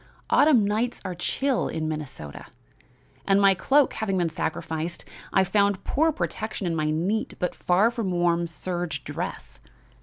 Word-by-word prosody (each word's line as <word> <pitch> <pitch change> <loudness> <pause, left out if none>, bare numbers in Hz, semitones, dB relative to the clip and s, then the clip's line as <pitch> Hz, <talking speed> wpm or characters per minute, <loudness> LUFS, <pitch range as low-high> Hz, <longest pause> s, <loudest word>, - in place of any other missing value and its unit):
Autumn 270 -9 +5
nights 220 +4 -1
are 185 - -3
chill 260 +9 0
in 160 -1 -3
Minnesota, 150 - -6 0.8
and, 195 0 +5
my 195 -1 +6
cloak 270 +9 +3
having 195 -3 -1
been 175 -2 +1
sacrificed, 160 0 -3 0.3
I 190 - +4
found 200 0 +1
poor 320 +3 +2
protection 205 - -4
in 170 -2 0
my 155 -1 0
neat 180 +8 -1
but 180 - -1
far 195 +6 +2
from 230 -5 -2
warm 175 -1 +1
serge 175 +1 -4
dress. - - -6
185 Hz, 150 wpm, -25 LUFS, 170-215 Hz, 0.8 s, my